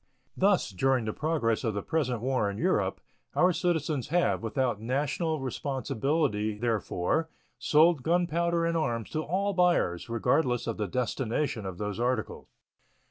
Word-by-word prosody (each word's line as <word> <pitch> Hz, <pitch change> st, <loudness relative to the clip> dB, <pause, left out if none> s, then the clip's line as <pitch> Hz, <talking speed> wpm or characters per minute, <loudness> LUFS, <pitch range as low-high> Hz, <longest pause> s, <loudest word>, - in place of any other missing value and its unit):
Thus, 195 Hz, -, +2 dB
during 125 Hz, +5 st, +1 dB
the 110 Hz, -, -2 dB
progress 145 Hz, -9 st, 0 dB
of 110 Hz, -4 st, -1 dB
the 100 Hz, -, -3 dB
present 130 Hz, -8 st, -1 dB
war 130 Hz, -4 st, +1 dB
in 100 Hz, -, -5 dB
Europe, -, -, 0 dB, 0.3 s
our 180 Hz, 0 st, +4 dB
citizens 160 Hz, -6 st, -1 dB
have, 175 Hz, +2 st, +1 dB
without 115 Hz, -1 st, -1 dB
national 150 Hz, +6 st, -1 dB
responsibility 135 Hz, -4 st, -1 dB
therefor, 115 Hz, -, -1 dB, 0.3 s
sold 155 Hz, 0 st, +4 dB
gunpowder 170 Hz, +1 st, +1 dB
and 170 Hz, 0 st, 0 dB
arms 120 Hz, -8 st, -1 dB
to 155 Hz, -, -1 dB
all 195 Hz, +6 st, -1 dB
buyers, 175 Hz, -, +2 dB
regardless 125 Hz, +2 st, +1 dB
of 115 Hz, -, -3 dB
the 105 Hz, -2 st, -2 dB
destination 120 Hz, 0 st, -2 dB
of 95 Hz, -2 st, -6 dB
those 105 Hz, 0 st, -4 dB
articles. 120 Hz, -2 st, -2 dB
135 Hz, 140 wpm, -28 LUFS, 115-160 Hz, 0.3 s, our